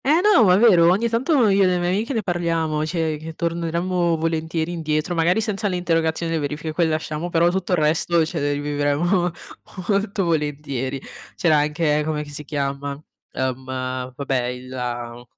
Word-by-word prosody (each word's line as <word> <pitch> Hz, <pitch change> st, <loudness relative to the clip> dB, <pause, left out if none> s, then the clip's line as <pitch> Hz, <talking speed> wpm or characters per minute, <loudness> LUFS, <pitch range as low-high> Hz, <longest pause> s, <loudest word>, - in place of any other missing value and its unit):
Eh 305 Hz, +5 st, +4 dB
no, 415 Hz, -, +6 dB
ma 180 Hz, -1 st, +6 dB
è -, -, +4 dB
vero, 185 Hz, -7 st, +6 dB
ogni 200 Hz, +6 st, +2 dB
tanto 245 Hz, +2 st, +2 dB
io 195 Hz, 0 st, +3 dB
e -, -, +6 dB
le 180 Hz, -1 st, +2 dB
mie 175 Hz, 0 st, 0 dB
amiche 210 Hz, +8 st, -1 dB
ne 225 Hz, -3 st, -1 dB
parliamo, 165 Hz, -4 st, -1 dB
cioè 160 Hz, -2 st, -1 dB
che 160 Hz, +1 st, -8 dB
torneremmo 170 Hz, +1 st, 0 dB
volentieri 160 Hz, +1 st, -1 dB
indietro, 155 Hz, -1 st, -1 dB
magari 175 Hz, +5 st, +2 dB
senza 210 Hz, -1 st, -1 dB
le 185 Hz, -, -1 dB
interrogazioni 165 Hz, -1 st, 0 dB
e 165 Hz, -, 0 dB
verifiche, 150 Hz, +2 st, -3 dB
quel 165 Hz, 0 st, +2 dB
lasciamo, 155 Hz, +1 st, -3 dB
però 170 Hz, 0 st, +3 dB
tutto 185 Hz, 0 st, -1 dB
il -, -, +3 dB
resto 160 Hz, +2 st, +2 dB
ce 160 Hz, 0 st, -4 dB
le 145 Hz, 0 st, 0 dB
rivivremmo 145 Hz, +5 st, 0 dB, 0.6 s
molto 200 Hz, 0 st, +1 dB
volentieri. 145 Hz, -5 st, -2 dB, 0.4 s
C'era 160 Hz, -3 st, +3 dB
anche 150 Hz, 0 st, +1 dB
com'è 150 Hz, -1 st, -2 dB
che 145 Hz, -, -11 dB
si 150 Hz, +1 st, -7 dB
chiama; 140 Hz, 0 st, -3 dB, 0.3 s
ehm, 130 Hz, 0 st, -2 dB, 0.5 s
vabbè 135 Hz, -2 st, -1 dB
il 125 Hz, +1 st, -6 dB
la 120 Hz, -1 st, -5 dB
165 Hz, 180 wpm, -22 LUFS, 150-180 Hz, 0.6 s, no